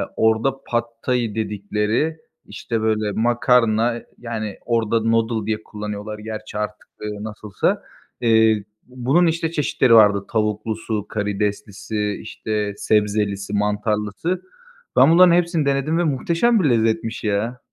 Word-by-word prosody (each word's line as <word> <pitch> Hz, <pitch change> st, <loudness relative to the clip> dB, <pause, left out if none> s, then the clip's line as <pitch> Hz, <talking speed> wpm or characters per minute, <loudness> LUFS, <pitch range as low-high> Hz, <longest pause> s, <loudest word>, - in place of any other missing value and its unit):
orda 110 Hz, +4 st, +2 dB, 0.2 s
Pad 120 Hz, 0 st, +2 dB, 0.2 s
Thai 120 Hz, -4 st, 0 dB
dedikleri, 105 Hz, +7 st, -1 dB, 0.3 s
işte, 110 Hz, +2 st, -4 dB
böyle 110 Hz, -1 st, 0 dB
makarna 120 Hz, 0 st, +2 dB, 0.2 s
yani 110 Hz, -4 st, -5 dB
orda 115 Hz, -1 st, +1 dB
noodle 115 Hz, -1 st, 0 dB
diye 110 Hz, 0 st, -2 dB
kullanıyorlar 105 Hz, 0 st, -6 dB
gerçi 110 Hz, 0 st, -7 dB
artık, 105 Hz, 0 st, -4 dB, 0.2 s
ııı, 105 Hz, -1 st, -5 dB
nasılsa. 105 Hz, -2 st, -2 dB, 0.4 s
Eee, 110 Hz, -2 st, +4 dB, 0.2 s
bunun 130 Hz, +8 st, +1 dB
işte 165 Hz, 0 st, -1 dB
çeşitleri 140 Hz, -5 st, +2 dB
vardı 100 Hz, -2 st, +5 dB
tavuklusu, 110 Hz, 0 st, -2 dB
karideslisi, 105 Hz, 0 st, -2 dB
işte 105 Hz, -1 st, -3 dB
sebzelisi, 105 Hz, -1 st, 0 dB
mantarlısı. 105 Hz, -, -1 dB, 0.6 s
Ben -, -, +7 dB
bunların 175 Hz, +1 st, +7 dB
hepsini 170 Hz, -3 st, +2 dB
denedim 140 Hz, +3 st, +1 dB
ve 175 Hz, -, +2 dB
muhteşem 170 Hz, -, +2 dB
bir 150 Hz, -, +2 dB
lezzetmiş 115 Hz, -1 st, 0 dB
ya. 110 Hz, +4 st, -1 dB
110 Hz, 120 wpm, -21 LUFS, 105-120 Hz, 0.6 s, Ben